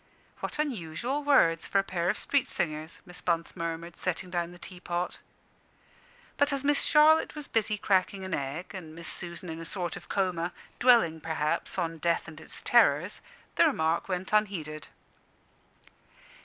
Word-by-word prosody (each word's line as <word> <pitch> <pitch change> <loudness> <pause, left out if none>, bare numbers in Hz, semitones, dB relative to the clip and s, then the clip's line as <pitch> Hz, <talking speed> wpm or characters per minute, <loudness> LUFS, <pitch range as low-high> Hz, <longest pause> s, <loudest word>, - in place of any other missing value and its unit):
"What - - -4
unusual 255 - -2
words 170 - +4
for - - +1
a 195 - +4
pair 180 -2 -1
of 210 - +1
street 280 -2 +2
singers!" 155 0 -3
Miss 180 -1 -9
Bunce 165 -1 -1
murmured, 170 0 -4
setting 180 0 -3
down 175 -1 -1
the 175 - -12
tea 180 +1 -10
pot. 175 0 -3 1.2
But 285 +1 +3
as 275 -1 -1
Miss 290 0 +3
Charlotte 310 +1 +5
was 300 -2 -7
busy 215 -1 +1
cracking 190 -1 +1
an 190 -1 -4
egg, 140 +6 -3
and 165 -5 -8
Miss 170 0 -8
Susan 175 0 -6
in 160 0 -5
a - - -6
sort 175 0 -2
of 175 -1 -11
coma, 180 -3 0 0.3
dwelling 225 -11 +5
perhaps 155 +1 -1
on 165 -2 -2
death 170 +1 +1
and 160 0 -10
its - - -6
terrors, - - +4 0.4
the - - +7
remark 160 +4 0
went 185 +2 -3
unheeded. 170 -8 0
175 Hz, 165 wpm, -29 LUFS, 165-205 Hz, 1.2 s, the